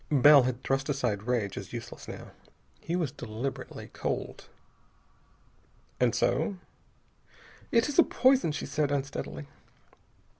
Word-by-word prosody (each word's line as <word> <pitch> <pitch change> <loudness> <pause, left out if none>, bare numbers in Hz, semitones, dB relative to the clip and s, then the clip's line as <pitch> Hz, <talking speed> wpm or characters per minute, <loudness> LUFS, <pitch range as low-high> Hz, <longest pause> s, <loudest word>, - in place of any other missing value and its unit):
Bell 145 0 +8
had 125 0 -2
thrust 135 +2 0
aside 125 -8 0
rage 115 -6 0
as - - -10
useless, - - -7
now. - - -8 0.5
He 170 - -3
was 165 -7 0
deliberately 120 +4 -6
cold. - - -4 1.5
"And 125 -2 +3
so?" 155 - +1 1.1
"It 230 +1 +4
is 290 +2 0
a - - +10
poison," 260 - +3
she 150 - -4
said 150 -2 0
unsteadily. 140 +1 -3
140 Hz, 120 wpm, -29 LUFS, 125-160 Hz, 1.5 s, a